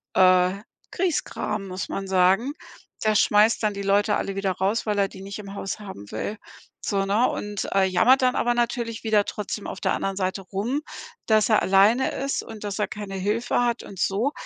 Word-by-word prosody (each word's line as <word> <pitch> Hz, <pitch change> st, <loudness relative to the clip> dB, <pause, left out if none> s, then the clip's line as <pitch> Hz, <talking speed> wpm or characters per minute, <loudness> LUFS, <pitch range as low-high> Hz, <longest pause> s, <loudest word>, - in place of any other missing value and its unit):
äh, 185 Hz, 0 st, +5 dB, 0.4 s
Grieskram, 220 Hz, -, -2 dB
muss 185 Hz, 0 st, -5 dB
man 195 Hz, 0 st, -4 dB
sagen. 190 Hz, +8 st, +3 dB, 0.5 s
Der 215 Hz, -, +4 dB
schmeißt 210 Hz, +3 st, +4 dB
dann 210 Hz, -1 st, +1 dB
die 200 Hz, -, -4 dB
Leute 200 Hz, +1 st, +2 dB
alle 195 Hz, -, -3 dB
wieder 195 Hz, -1 st, 0 dB
raus, 200 Hz, +6 st, 0 dB
weil 210 Hz, -, 0 dB
er 195 Hz, -, +3 dB
die 190 Hz, -, -11 dB
nicht 195 Hz, +1 st, -7 dB
im 200 Hz, -1 st, -8 dB
Haus 195 Hz, +1 st, -4 dB
haben 190 Hz, -, -9 dB
will, 205 Hz, -, -4 dB, 0.5 s
so, 195 Hz, -2 st, 0 dB
ne 210 Hz, +5 st, +2 dB
und, 205 Hz, -1 st, -4 dB
äh, 195 Hz, -, +4 dB
jammert 225 Hz, +9 st, +4 dB
dann 255 Hz, +1 st, +3 dB
aber 240 Hz, -, +2 dB
natürlich 235 Hz, -1 st, -2 dB
wieder 215 Hz, -2 st, +3 dB
trotzdem 210 Hz, 0 st, -5 dB
auf -, -, -6 dB
der -, -, +1 dB
anderen 195 Hz, 0 st, -2 dB
Seite 190 Hz, 0 st, -1 dB
rum, 210 Hz, +10 st, -2 dB, 0.5 s
dass 215 Hz, 0 st, +3 dB
er 215 Hz, -, +4 dB
alleine 200 Hz, +7 st, +4 dB
ist 275 Hz, +1 st, -2 dB
und 220 Hz, -2 st, -10 dB
dass 205 Hz, 0 st, -4 dB
er 210 Hz, -, +1 dB
keine 210 Hz, -4 st, -7 dB
Hilfe 210 Hz, +6 st, 0 dB
hat 240 Hz, 0 st, -1 dB
und 195 Hz, -2 st, -11 dB
so, 215 Hz, +11 st, +1 dB
205 Hz, 200 wpm, -24 LUFS, 195-225 Hz, 0.5 s, äh